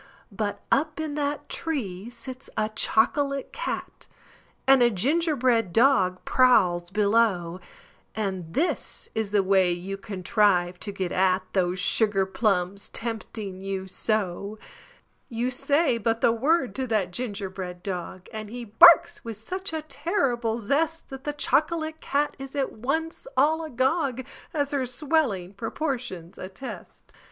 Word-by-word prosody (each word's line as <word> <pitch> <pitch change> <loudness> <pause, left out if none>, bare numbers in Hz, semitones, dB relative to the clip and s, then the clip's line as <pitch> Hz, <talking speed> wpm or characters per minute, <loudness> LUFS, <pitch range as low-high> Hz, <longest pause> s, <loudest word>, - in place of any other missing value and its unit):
But 205 0 -3
up 305 +2 +1
in 310 -2 -3
that 290 0 -2
tree 230 - -3
sits 255 +2 -7
a 215 0 +1
chocolate 275 +5 +1
cat, - - -5 0.6
And 270 -1 +6
a 240 - +6
ginger 295 - +1
bread 235 -7 +2
dog 210 -6 +3
prowls 185 -9 +4
below 200 -4 +2 0.6
And 190 -6 -3
this 325 +7 -1
is 220 -2 -1
the 205 -1 +2
way 190 -2 +4
you 185 +3 -4
contrive 185 -2 +1
to 205 - -4
get 190 -3 -3
at 185 0 +2
Those 180 -1 +1
sugar 200 0 +2
plums 195 -1 0
tempting 220 -4 -5
you 195 -1 -4
so: 200 0 -1 0.7
You 240 +1 -1
say 280 0 +1
but 225 +1 0
the - - +5
word 265 - +1
to 260 -1 -1
that 210 -6 0
gingerbread 190 -5 -5
dog 180 -1 -5
And 215 -1 -6
he 240 +1 -6
barks 340 +10 +7
with 230 -3 -6
such 370 - -4
a 320 -1 -3
terrible 275 - -1
zest 300 +9 -1
That 270 0 -8
the 295 - 0
chocolate 315 +3 0
cat 290 +1 0
is 270 +1 -8
at 275 -2 0
once 320 - -3
all 310 +4 +3
agog, 265 -2 0 0.3
As 285 -3 -1
her 270 -3 0
swelling 250 - 0
proportions 225 - -4
attest. 190 +8 -9
230 Hz, 140 wpm, -26 LUFS, 195-280 Hz, 0.7 s, barks